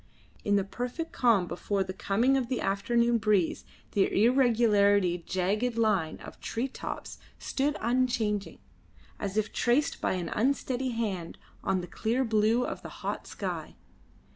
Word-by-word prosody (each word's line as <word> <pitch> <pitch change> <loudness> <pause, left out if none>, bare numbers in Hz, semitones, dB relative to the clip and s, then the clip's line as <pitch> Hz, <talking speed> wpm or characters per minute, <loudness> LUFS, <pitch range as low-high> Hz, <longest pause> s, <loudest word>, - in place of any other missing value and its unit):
In 205 - +2
the 200 - +3
perfect 245 - -4
calm 230 -7 +3
before 195 +3 -1
the 185 0 -6
coming 230 +9 +2
of 260 -3 0
the 255 -1 -1
afternoon 235 +4 +2
breeze 205 -5 +1 0.3
the 195 - +2
irregularly 205 -8 +3
jagged 210 +6 0
line 205 -8 +1
of - - -11
tree 235 +4 -2
tops 270 - -7 0.2
stood 290 +2 -1
unchanging, 230 -4 0 0.6
as 200 0 -3
if 215 0 0
traced 250 +5 +1
by - - +1
an 180 -2 -3
unsteady 260 +1 0
hand 205 -8 -3 0.3
on 190 -1 +1
the - - -6
clear 230 +8 0
blue 225 +2 +2
of - - -5
the - - -8 0.2
hot - - -3
sky. - - -5
220 Hz, 145 wpm, -29 LUFS, 195-245 Hz, 0.6 s, the